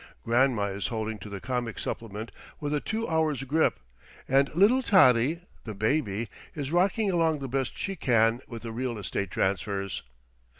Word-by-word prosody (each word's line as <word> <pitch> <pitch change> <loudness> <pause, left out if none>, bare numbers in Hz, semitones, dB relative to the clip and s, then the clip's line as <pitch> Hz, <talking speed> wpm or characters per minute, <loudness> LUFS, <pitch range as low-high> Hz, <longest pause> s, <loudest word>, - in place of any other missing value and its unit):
Grandma 120 -2 +3
is 100 0 -2
holding 110 -2 -3
to 105 - -9
the 100 -1 -6
comic 120 -1 -3
supplement 110 -1 -5 0.3
with 145 -1 -2
a 150 - +2
two 225 +8 -3
hours' 155 -5 +1
grip; 155 +4 +1 0.5
and 135 +1 +3
little 215 +9 +5
Tottie, 155 - +5 0.2
the 110 -3 -6
baby, 110 -1 0 0.3
is 145 -2 -4
rocking 195 +4 +2
along 165 -3 +2
the 140 -1 -5
best 135 +1 -2
she 195 - -3
can 115 -5 +2
with 115 -2 -8
the 115 - -5
real 120 0 -3
estate 100 -1 -3
transfers. 100 +1 -1
125 Hz, 165 wpm, -28 LUFS, 110-155 Hz, 0.5 s, little